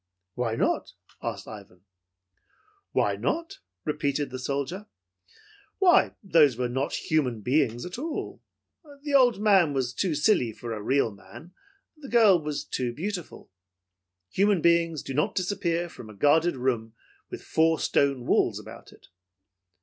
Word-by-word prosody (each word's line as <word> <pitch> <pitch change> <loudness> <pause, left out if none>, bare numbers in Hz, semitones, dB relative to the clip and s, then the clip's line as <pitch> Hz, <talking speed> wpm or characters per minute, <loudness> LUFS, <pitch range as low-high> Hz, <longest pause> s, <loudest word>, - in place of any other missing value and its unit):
"Why 115 -1 -2
not?" - - -1 0.3
asked - - -5
Ivan. 100 -4 -12 1.1
"Why - - +1
not?" 335 +1 -3 0.3
repeated 145 -2 -1
the 130 - -5
soldier. 140 +10 -3 0.9
"Why, 370 -3 +4
those 155 - +4
were 125 -1 0
not 130 +4 -2
human 130 -8 -1
beings 125 -1 0
at 180 +6 -7
all. 315 +2 -5 0.6
The 290 -1 -4
old 250 -6 +5
man 195 -8 +4
was 130 -3 -1
too 170 +3 -1
silly 145 - +2
for 115 +1 -6
a 105 - -5
real 130 +1 +1
man, 130 - -14 0.4
the 295 -4 -11
girl 215 -7 +5
was 150 -1 -4
too 125 -2 -2
beautiful. 175 - -6 0.8
Human 200 -1 +2
beings 170 -2 +2
do 135 - -6
not 150 +3 0
disappear 175 -3 -1
from 115 -9 -12
a 105 - -12
guarded 155 - +3
room 120 -3 -2 0.3
with - - -8
four 160 0 +2
stone 140 -3 +1
walls - - +2
about - - -11
it." - - -20
150 Hz, 140 wpm, -26 LUFS, 125-185 Hz, 1.1 s, old